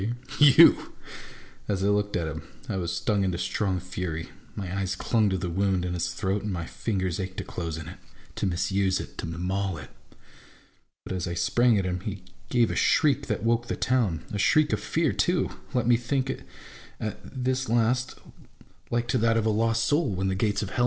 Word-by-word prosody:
You! 145 -3 +7 0.3
'" - - -20
As 95 -2 -1
I - - +2
looked 105 0 +1
at 85 -2 -2
him, 80 - -5 0.3
I - - -2
was 85 -2 -2
stung 105 0 0
into 90 -2 0
strong 95 0 -1
fury. 90 -3 -5 0.3
My 95 -2 -4
eyes 95 -1 -1
clung 110 +2 +2
to 95 - 0
the 90 0 -3
wound 95 +1 0
in 90 - -2
his 90 0 -1
throat, 95 +3 -1
and 105 - -3
my 85 -3 -3
fingers 95 -1 -2
ached 95 0 -5
to - - -2
close 85 -2 -5
in 80 - -7
it - - -10 0.2
— - - -25
to - - 0
misuse 95 +1 +1
it, - - -8
to - - -3
maul 90 +2 -2
it. 75 - -10 1.1
But - - -4
as 90 -1 -2
I 85 - -3
sprang 115 +7 +3
at 95 - 0
him, 90 0 -1
he 100 0 -6 0.3
gave 120 -2 +3
a - - -3
shriek 140 -2 +3
that 105 -3 -2
woke 115 +1 +1
the - - -2
town; 105 - +1
a 105 - -2
shriek 150 - +3
of 105 - +1
fear 155 +10 0
too, 175 0 +1 0.2
let 125 -2 +2
me 120 0 +5
think 130 +2 -1
it - - -8 0.5
at 110 - -4
this 130 -1 -2
last, 120 +2 +1 0.7
like 120 0 0
to 125 - +2
that 115 0 +3
of 110 - +1
a 110 - +3
lost 115 +2 +1
MY 145 - +5
ENEMY 105 - -2
AND 95 0 -1
MYSELF. 105 -2 0
100 Hz, 210 wpm, -27 LUFS, 90-115 Hz, 1.1 s, You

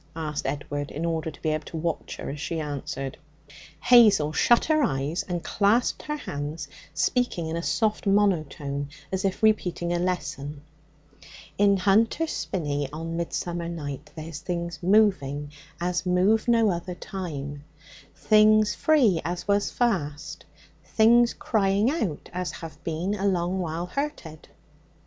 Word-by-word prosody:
asked 155 -4 -3
Edward, 145 +1 -3
in 160 +3 -4
order 160 -1 -1
to 150 - -12
be 155 - +1
able 155 0 -1
to 165 - -6
watch 165 0 -3
her - - -5
as 145 - -7
she 165 +2 -3
answered. 140 -3 -4 0.7
Hazel 210 -11 +6
shut 240 +8 +4
her 310 -1 +3
eyes 140 - 0
and 175 -2 -4
clasped 215 +7 +2
her 300 - -3
hands, 145 - -5 0.2
speaking 175 +3 0
in 160 +1 -3
a 170 - -2
soft 215 +3 0
monotone 155 -8 +1 0.2
as 190 +1 -1
if 195 +2 -2
repeating 180 -5 +2
a 175 - 0
lesson. 150 -5 -3 1.0
'In 200 -1 +5
Hunter's 225 - +2
Spinney 145 -6 -2
on 165 +2 -5
midsummer 170 0 -3
night 145 -3 -6
there's 160 -1 -7
things 170 0 -4
moving 175 -8 +2 0.3
as 175 0 -1
move 190 +5 +2
no 230 -3 +4
other 175 +1 -4
time; 145 -7 -6 0.5
things 215 -1 +4
free 235 - +3
as 175 +1 -4
was 200 0 +2
fast; 165 -10 -2 0.4
things 235 +2 +4
crying 205 +2 +1
out 210 - -3
as 180 0 -2
have 165 -1 -9
been 170 +5 -2
a 200 -1 -1
long 180 0 0
while 170 -1 -3
hurted.' 180 - -5
175 Hz, 145 wpm, -26 LUFS, 155-205 Hz, 1.0 s, Hazel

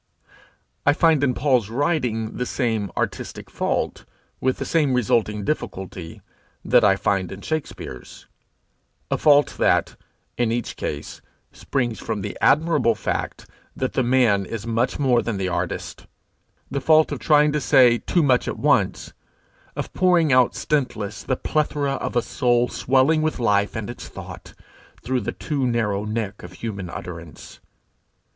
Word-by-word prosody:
I 145 - +4
find 160 -2 +3
in 130 -3 +2
Paul's 125 -7 +1
writing 120 -5 -1
the 125 - -1
same 110 -6 -1
artistic - - -4
fault, - - -2 0.4
with 130 0 0
the - - -4
same 150 -6 +2
resulting 105 -3 +1
difficulty, 95 - -5 0.4
that - - +4
I 95 -1 +5
find 95 -2 -1
in 95 +1 -8
Shakspere's 140 - -6 0.9
a - - 0
fault 145 -1 +4
that, - - +2 0.4
in 120 -2 +2
each 120 +1 -3
case, - - -5 0.3
springs 120 -5 -2
from 105 - -3
the 105 +1 -5
admirable 145 -5 +3
fact - - -3 0.3
that 130 - -2
the - - +1
man 120 -5 +3
is 110 +3 -6
much 115 +2 0
more 130 -4 +3
than 115 -4 -3
the 95 -1 -1
artist - - -4 0.6
the 140 - -2
fault 155 +3 +4
of - - -3
trying 150 -1 +4
to 150 0 -1
say 125 -5 +5
too 175 - +1
much 130 -3 +2
at - - -3
once, - - +1 0.6
of - - -5
pouring 175 -6 +3
out 125 -1 +4
stintless 110 -8 -2
the 130 - -1
plethora 145 -2 -1
of - - -4
a 120 - +2
soul 120 -2 +1
swelling 135 +5 +2
with 155 0 -1
life 105 -3 +1
and 110 -2 -4
its 120 - -8
thought, - - -10 0.5
through 125 +1 -1
the 100 - -3
too 140 -5 -2
narrow 105 -4 0
neck 105 -2 -3
of 90 +1 -10
human 100 -2 -6
utterance. 85 -3 -9
120 Hz, 150 wpm, -23 LUFS, 105-145 Hz, 0.9 s, I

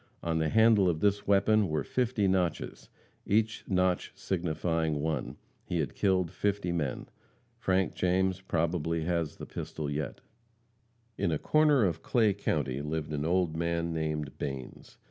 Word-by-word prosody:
On 80 -1 0
the 80 -1 +1
handle 110 -3 +5
of 80 -2 -1
this 100 +1 +1
weapon 100 0 +4
were 75 -1 0
fifty 120 -5 0
notches, 90 -4 -1 0.3
each 110 +2 +1
notch 90 -2 +1
signifying 80 -3 -1
one. 75 -3 -2 0.3
He 90 - -3
had 75 -5 -2
killed 95 -4 +1
fifty 100 -2 -1
men. 75 -6 -2 0.5
Frank 95 0 +1
James 95 +1 +1
probably 85 -2 -1
has 85 -2 -1
the - - -8
pistol 75 -2 -5
yet. 75 +1 -4 1.0
In 85 - +1
a 80 - +1
corner 150 - +4
of 85 -3 -1
Clay 110 -4 +2
county 70 -9 -1
lived 75 0 -3
an 75 0 -2
old 85 -1 +1
man 85 0 -1
named 75 -3 -2
Banes. 65 -2 -6
85 Hz, 145 wpm, -30 LUFS, 80-95 Hz, 1.0 s, handle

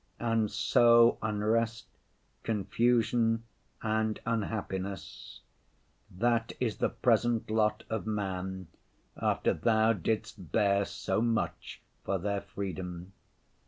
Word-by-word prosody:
And 115 -2 +1
so 115 +2 +5
unrest, 110 +2 0 0.6
confusion 115 +1 +1 0.4
and 110 0 0
unhappiness—that 110 +1 -4
is 115 -4 -1
the - - +1
present 120 -2 +1
lot 110 -1 +1
of 110 0 -3
man 95 -3 -3 0.5
after - - +1
Thou 110 0 +3
didst 105 -2 -3
bear 100 -2 +3
so 95 +2 -2
much 115 -1 -2 0.2
for 100 - 0
their 100 +2 -2
freedom! 95 -2 -6
110 Hz, 90 wpm, -30 LUFS, 100-115 Hz, 0.6 s, so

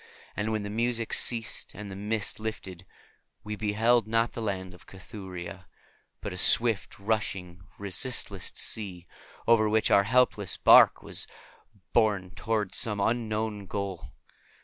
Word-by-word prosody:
And 105 +1 -2
when 110 -1 -1
the 100 - -5
music 115 +1 -1
ceased 115 -2 0
and 105 -1 -8
the - - -7
mist 105 +1 -2
lifted, 95 -5 -6 0.6
we 105 0 -4
beheld 110 +2 +2
not 115 +1 +1
the 115 - -5
Land 95 -4 -3
of 90 - -17
Cathuria, 95 -1 -9 0.5
but - - -5
a - - -7
swift 115 -5 +3
rushing 95 -4 -3 0.2
resistless 100 -1 -1
sea, 95 -5 -2 0.4
over 110 -2 +5
which 110 0 +2
our 100 0 +5
helpless 110 -4 +2
barque - - +7
was - - -3 0.7
borne 105 -5 +2
toward 105 -3 -2
some 105 -4 +1
unknown 110 -2 -1
goal. 100 -2 -5
105 Hz, 135 wpm, -28 LUFS, 95-110 Hz, 0.7 s, barque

